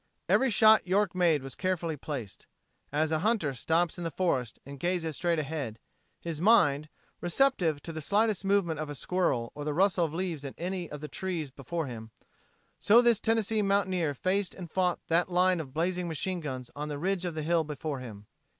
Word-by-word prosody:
Every 265 - +4
shot 220 -3 +6
York 195 0 +2
made 170 -6 +2
was 135 - -7
carefully 175 -4 -1
placed. 130 -8 -7 0.4
As 155 +2 +1
a 155 - +1
hunter 200 -7 +1
stops 165 +7 0
in - - -4
the 165 - -1
forest 135 - -1
and 140 0 -9
gazes 170 -1 -1
straight 170 +1 +1
ahead, 145 -7 -3 0.4
his 165 -2 -5
mind, 155 -9 +4 0.3
receptive 175 - +1
to 165 - -6
the 155 - -5
slightest 205 +4 +1
movement 195 -6 +1
of 155 -1 -4
a 145 - -5
squirrel 140 -8 0
or 145 - -6
the 150 0 -2
rustle 185 0 +3
of 155 - -4
leaves 165 -3 -3
in 135 - -7
any 180 0 -3
of 150 -1 -7
the 150 - -5
trees 165 -2 -4
before 155 +5 -4
him, 115 -4 -8 0.7
so 220 +3 +6
this 235 -3 +4
Tennessee 225 -1 +1
mountaineer 190 -6 +1
faced 185 +6 -1
and 175 -4 -9
fought 180 -2 +1
that 170 +2 +2
line 180 0 +3
of 145 -5 -6
blazing 175 +4 -1
machine 175 +3 -2
guns 130 -6 -6
on 150 +1 -4
the 145 - -3
ridge 185 +3 -1
of 175 -3 -3
the 155 - -3
hill 165 +1 +2
before 150 -1 -4
him. 105 -5 -9
170 Hz, 195 wpm, -29 LUFS, 150-185 Hz, 0.7 s, shot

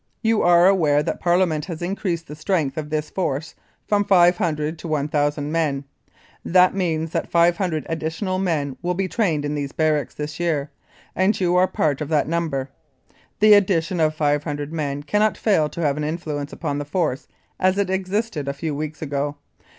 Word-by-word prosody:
You 225 -1 +2
are 175 0 +5
aware 155 -7 +3
that - - -3
Parliament 175 -3 +1
has 170 -4 -6
increased 175 -2 -2
the 150 - -9
strength 155 -3 -1
of 155 -1 -4
this 155 0 -2
Force 160 -4 -2 0.3
from 205 -1 +2
500 175 -5 +2
to 170 - -7
1,000 145 -1 0
men. 150 -4 0 0.6
That 180 +1 +4
means 165 -4 -1
that - - -2
500 170 -1 +2
additional 165 +4 -2
men 150 -8 -1
will 180 +1 -1
be 190 +1 -1
trained 170 -9 0
in 145 - -2
these 145 -2 -3
barracks 155 -2 0
this 150 +1 -5
year, 155 -4 -1 0.4
and 190 +3 +2
you 180 -2 +2
are 180 +1 +4
part 150 -5 0
of 150 - -3
that 155 -2 +2
number. 155 -5 -2 0.7
The 215 0 +8
addition 185 -3 +2
of 155 -1 +2
500 145 0 -1
men 145 -3 -3
cannot 210 +8 +1
fail 160 -9 +2
to 170 - -6
have 145 -2 +1
an 150 - -2
influence 150 -2 -4
upon 145 -3 -3
the 145 - -4
Force 150 -3 -1 0.3
as 185 +1 +2
it 200 -2 0
existed 190 -4 -2
a 140 - -1
few 150 +2 -4
weeks 155 +2 -5
ago. 145 0 -2
160 Hz, 180 wpm, -22 LUFS, 150-180 Hz, 0.7 s, The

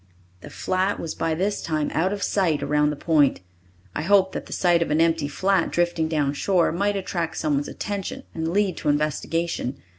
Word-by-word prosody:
The - - -11
flat 185 +2 -1
was 165 - -4
by 165 -1 -1
this 200 +5 -1
time 155 -2 -1
out 185 +4 +1
of 205 0 -3
sight 165 -8 +1
around 150 +1 +2
the 150 - -2
point. 145 - +2 0.5
I - - -2
hoped 190 +2 +4
that - - -6
the - - -13
sight 175 -2 +2
of 170 - 0
an 150 +1 +2
empty 165 -3 +2
flat 190 +4 +1
drifting 175 -2 0
down 150 -3 0
shore 175 +4 +2
might 200 +4 0
attract 170 -4 -3
someone's 145 -2 0
attention 200 -2 -5
and 160 -1 -3
lead 190 +1 +1
to - - -1
investigation. 150 -1 -1
165 Hz, 190 wpm, -24 LUFS, 150-190 Hz, 0.5 s, hoped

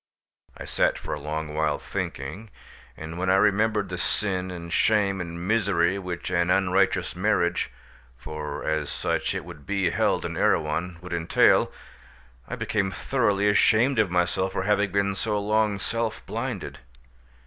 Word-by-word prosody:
I - - -7
sat - - +1
for - - -5
a 75 - -4
long 75 +1 -4
while 75 -1 +1
thinking, 80 +12 -5 0.5
and 80 +2 -7
when 95 +1 0
I 95 - +5
remembered 105 0 +2
the 90 -1 -4
sin 95 -1 -1
and 85 -2 -7
shame 100 -3 +2
and 85 +1 -6
misery 100 -4 +2
which 90 -1 -5
an 85 0 +1
unrighteous 95 -1 +2
marriage—for 75 - -3
as 80 -2 0
such - - -1
it - - -4
would 85 -5 -12
be 95 -4 +1
held - - +1
in - - -4
Erewhon—would 85 +3 0
entail, 85 -1 +3 0.8
I - - -4
became 95 -2 -1
thoroughly 105 -2 +1
ashamed 110 +5 +4
of 105 -4 +3
myself 90 +2 0
for - - -1
having 105 -1 +2
been 100 0 +1
so 105 +1 -1
long 105 0 +1
self 115 +2 -3
blinded. 110 - -4
95 Hz, 150 wpm, -26 LUFS, 85-105 Hz, 0.8 s, I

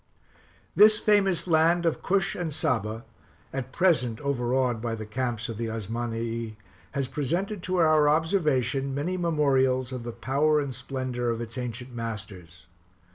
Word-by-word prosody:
This 210 +1 +7
famous 200 -5 +2
land 170 +1 +3
of 165 - 0
Cush 195 -1 +1
and 170 -3 -3
Saba, 115 -7 -1 0.5
at 130 -1 -4
present 130 -10 +2
overawed 125 -3 0
by 115 -1 -2
the 110 -1 -6
camps 120 0 -2
of 115 -2 -6
the 115 - -2
Osmanii, 115 +1 -3 0.4
has 140 -3 -1
presented 170 +9 -2
to 185 +1 -2
our 155 -3 +4
observation 145 -5 +1
many 165 +6 -1
memorials 135 -7 +1
of 130 -1 -4
the 120 0 -5
power 140 +6 +1
and 140 -3 -3
splendor 125 -1 -3
of 115 -1 -1
its 115 -1 -6
ancient 125 0 -5
masters. 100 -7 -7
130 Hz, 145 wpm, -27 LUFS, 115-155 Hz, 0.5 s, This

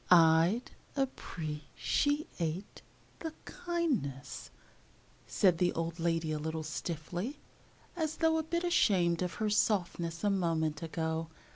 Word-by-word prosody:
"I'd 170 +6 +6 0.3
ap 270 -1 +1
pre 150 -3 -5
ci 290 +1 +2
ate 170 +4 -3 0.4
the 320 -2 -4
kindness," 260 - -2 0.8
said 180 -4 +3
the 180 -1 +3
old 165 +1 -3
lady 165 -1 +1
a 155 - -1
little 160 +1 -3
stiffly, 175 - -4 0.6
as 315 -3 -1
though 320 -1 +3
a - - -1
bit 340 +2 -1
ashamed 185 - +3
of 180 -1 -1
her 215 -1 0
softness 175 -5 +1
a 205 - +3
moment 165 -5 +1
ago. 160 0 -2
175 Hz, 130 wpm, -32 LUFS, 160-250 Hz, 0.8 s, I'd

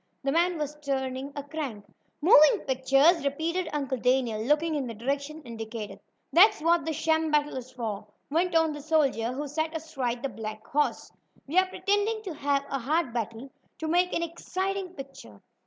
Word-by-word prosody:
The 275 - +1
man 345 +3 +2
was 300 -1 -3
turning 265 0 -2
a 285 - -4
crank. 280 -8 -5 0.4
"Moving 305 -3 +7
pictures!" 275 +5 +4
repeated 320 +5 -1
Uncle 275 -4 -2
Daniel, 250 -3 +1
looking 300 +7 +2
in 280 -4 -1
the 230 - -6
direction 280 +6 -3
indicated. 225 -3 -7 0.3
"That's 410 +5 +7
what 330 0 +2
this 320 -1 -2
sham 320 +1 +1
battle 295 -1 +1
is 255 -1 -6
for," 220 -5 -5 0.2
went 340 +3 +1
on 325 -1 +4
the 295 - -7
soldier 280 -7 +1
who 285 +3 -4
sat 315 +3 -2
astride 265 -7 -3
the 275 - -1
black 215 -1 -7
horse. 295 +2 -1 0.3
"We 320 +7 +3
are 375 - +2
pretending 410 +3 0
to 375 -5 -5
have 280 -1 0
a 275 - -1
hard 285 +1 0
battle, 235 +3 -4 0.3
to 320 - -4
make 355 +3 +2
an 335 - 0
exciting 370 +2 -3
picture. 270 - -11
285 Hz, 175 wpm, -28 LUFS, 255-325 Hz, 0.4 s, Moving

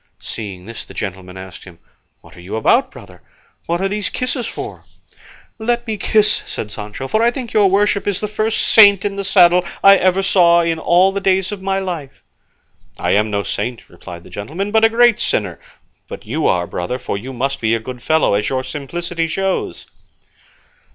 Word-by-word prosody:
Seeing 100 -5 -7
this 115 +2 -8
the - - -14
gentleman 95 -2 -6
asked 95 0 -10
him, 90 -3 -14 0.4
"What - - -17
are 85 - -13
you 90 +5 -6
about, 110 - +2
brother? - - -14 0.5
What 170 +2 -1
are 195 - +1
these 205 0 -2
kisses 255 -1 -2
for?" - - -7 0.8
"Let 240 +2 -1
me 220 -2 -3
kiss," 210 +1 +2
said 105 - -5
Sancho, 105 +5 -7
"for 215 +10 0
I 235 - +4
think 240 -1 -6
your 205 -2 +4
worship 200 +1 +1
is 200 -1 0
the 210 - -3
first 215 +1 -1
saint 200 -3 +6
in 200 -1 -2
the 200 - -3
saddle 180 -2 +5 0.2
I 195 0 +8
ever 185 +1 +2
saw 170 -3 +4
all 175 +4 +3
the 200 0 -3
days 190 0 +1
of 205 -2 -6
my 195 0 -1
life." 175 -8 -6 0.7
"I - - -1
am 105 +2 +2
no 100 -1 -1
saint," 115 +4 -4
replied 85 0 -11
the - - -15
gentleman, 165 - -5
"but 220 +1 +3
a 225 - +6
great 235 0 +4
sinner; 95 -6 -1 0.5
but - - -9
you - - -1
are, 90 -1 +1
brother, 90 +8 -4
for 125 - -4
you 120 +7 -6
must 135 +2 -3
be 110 0 +2
a - - -2
good 125 +2 -8
fellow, 155 -4 +2
as 105 +1 0
your 130 -1 -2
simplicity 165 +5 -4
shows." 195 +3 -2
175 Hz, 195 wpm, -18 LUFS, -, 0.8 s, I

